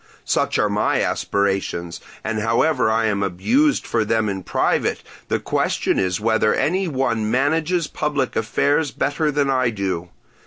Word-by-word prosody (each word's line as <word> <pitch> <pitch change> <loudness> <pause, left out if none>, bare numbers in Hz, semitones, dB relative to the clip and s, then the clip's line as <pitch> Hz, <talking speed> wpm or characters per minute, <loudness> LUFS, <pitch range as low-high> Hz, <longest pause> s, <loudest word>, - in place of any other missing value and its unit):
Such - - +1
are - - +2
my - - +1
aspirations, 95 -4 -1 0.2
and 110 0 -2
however 115 +4 +2
I 110 +1 +2
am 100 -2 0
abused 235 - +1
for 115 -2 0
them 110 0 0
in 95 -1 -3
private, - - 0 0.2
the - - +1
question - - 0
is 90 -1 0
whether 110 0 +2
any 185 +4 0
one 120 -7 -1
manages 160 +7 +1
public 145 -4 -2
affairs 145 +7 +1
better 150 +3 -1
than 145 -2 +1
I 130 -2 +2
do. 95 -5 -3
115 Hz, 150 wpm, -21 LUFS, 100-145 Hz, 0.2 s, are